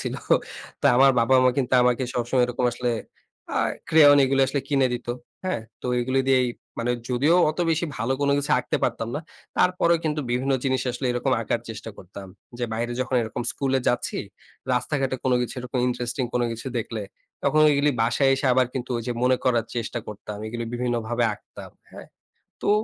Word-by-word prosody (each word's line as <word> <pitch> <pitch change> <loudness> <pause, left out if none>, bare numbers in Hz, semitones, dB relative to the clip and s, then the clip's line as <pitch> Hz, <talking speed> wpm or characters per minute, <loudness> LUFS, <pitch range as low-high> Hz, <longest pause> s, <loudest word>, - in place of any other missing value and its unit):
ছিল। - - -3 0.7
তো - - +4
আমার 135 +1 +7
বাবা 125 +3 +3
মা 130 - +6
কিন্তু 130 -1 -1
আমাকে 125 +1 +2
সবসময় 125 +1 +1
এরকম 125 0 -2
আসলে 120 0 -1 0.6
আ - - +1 0.3
crayon 145 -3 +7
এগুলো 135 +1 +2
আসলে 140 +1 -1
কিনে 135 -2 +3
দিত, 120 0 -5 0.4
হ্যাঁ? 185 -11 -1 0.2
তো - - -4
এগুলি 130 +2 +1
দিয়েই, 130 -2 +4 0.3
মানে 120 +1 0 0.2
যদিও 140 +7 +3
অত 155 - -10
বেশি 165 +2 +1
ভালো 115 +4 -1
কোনো 140 0 +2
কিছু 145 - -2
আঁকতে - - -1
পারতাম 115 - -2
না, 150 - -2 0.4
তারপরেও 170 -2 +3
কিন্তু 150 -1 0
বিভিন্ন 130 +3 0
জিনিস 130 -1 +1
আসলে 125 +2 -3
এরকম 125 +2 0
আঁকার 115 +1 -1
চেষ্টা 110 +1 -7
করতাম। 95 +2 -10 0.3
যে 120 - -1
বাইরে 120 +2 -2
যখন 130 +1 -2
এরকম 115 +2 -4
স্কুলে 135 -1 0
যাচ্ছি, 125 - -1 0.6
রাস্তাঘাটে 135 +1 -1
কোনো 130 -1 +3
কিছু 125 - -3
এরকম 125 +1 -4
ইন্টারেস্টিং 120 +1 -2
কোনো 120 - +2
কিছু 115 +3 -8
দেখলে, 110 -1 -4 0.4
তখন 150 +2 +3
এইগুলি 145 +1 +3
বাসায় 120 +4 +2
এসে 135 +1 -2
আবার 130 0 +3
কিন্তু 125 -1 -4
ওইযে 120 +1 -3
মনে 130 0 +4
করার 120 -3 +2
চেষ্টা 115 +1 -2
করতাম। 105 0 -7
এগুলি 115 +1 -4
বিভিন্নভাবে 120 -1 -1
আঁকতাম, 105 - -13 0.2
হ্যাঁ? - - -11 0.6
তো - - 0
125 Hz, 180 wpm, -24 LUFS, 120-135 Hz, 0.7 s, আমার